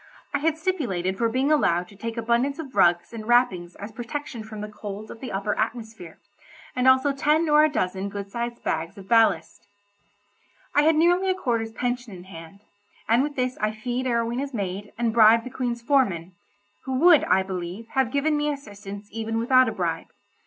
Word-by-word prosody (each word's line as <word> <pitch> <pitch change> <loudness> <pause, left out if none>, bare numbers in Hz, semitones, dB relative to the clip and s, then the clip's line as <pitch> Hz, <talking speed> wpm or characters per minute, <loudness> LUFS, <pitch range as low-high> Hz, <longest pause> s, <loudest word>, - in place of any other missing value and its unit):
I 285 - +1
had 320 +2 +1
stipulated 240 - -1
for 230 - +2
being 260 +5 +1
allowed 180 - +2
to 200 - -15
take 230 +3 -6
abundance 235 +5 +1
of 290 -5 -8
rugs 175 +4 +3
and 220 -1 -7
wrappings 215 -8 +2
as 205 +2 -8
protection 245 +2 -6
from 215 -1 -8
the 210 - -4
cold 210 0 -8
of 225 - -10
the 255 - -6
upper 200 +2 -1
atmosphere, 220 -6 -4 0.6
and 250 0 +1
also 260 +2 +5
ten 300 +4 +2
or 300 0 +6
a 310 - +4
dozen 190 -7 -2
good 200 0 -7
sized 235 +1 -4
bags 165 +3 -2
of 195 -1 -11
ballast. 225 -2 +2 1.1
I 290 - +5
had 315 +1 +4
nearly 350 +4 +3
a 375 - +2
quarter's 230 -9 -1
pension 245 -1 -3
in 175 - -11
hand, 175 +1 -12 0.5
and 230 +3 +4
with 290 +1 -2
this 255 -1 -2
I 215 0 0
fee'd 245 +4 -3
Arowhena's 240 +3 -1
maid, 200 0 -4
and 230 -1 0
bribed 225 0 +6
the 255 - -8
Queen's 240 -2 -3
foreman—who 205 - -2
would, 325 +3 +6
I 190 - +3
believe, 190 +4 -6
have 265 -3 +1
given 285 +4 +1
me 295 0 0
assistance 205 -7 -8
even 225 0 -3
without 255 +2 +4
a - - -3
bribe. - - -3
230 Hz, 190 wpm, -25 LUFS, 205-265 Hz, 1.1 s, or